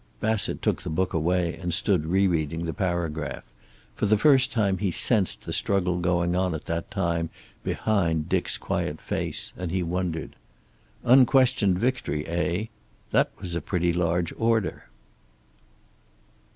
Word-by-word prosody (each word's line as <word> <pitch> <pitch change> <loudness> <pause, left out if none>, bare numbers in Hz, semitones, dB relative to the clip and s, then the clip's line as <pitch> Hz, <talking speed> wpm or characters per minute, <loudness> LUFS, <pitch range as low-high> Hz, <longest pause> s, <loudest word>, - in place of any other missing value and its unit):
Bassett 110 -1 -1
took - - +1
the - - -5
book 90 +4 -1
away 85 +1 +1
and 90 -1 -2
stood 90 -4 +1
rereading 85 -3 +1
the 80 - -3
paragraph. 85 -7 -2 0.5
For - - -1
the 110 +1 +4
first 135 +2 +4
time 100 -6 +1
he 100 -1 0
sensed 100 +2 +2
the - - -5
struggle 90 -3 +1
going 85 0 +1
on 90 -2 +1
at 80 - -7
that 85 0 -3
time 85 -4 -1 0.3
behind 85 -8 0
Dick's - - 0
quiet - - -2
face, - - -3
and 90 -1 -4
he 90 +1 -1
wondered. 85 -2 -3 0.7
Unquestioned 125 -6 +5
victory, 110 - -1
eh? 85 +4 -1 0.5
That - - +3
was 90 - -6
a 85 - -2
pretty 85 +1 0
large 85 0 0
order. 115 -5 0
90 Hz, 140 wpm, -26 LUFS, 85-100 Hz, 0.7 s, Unquestioned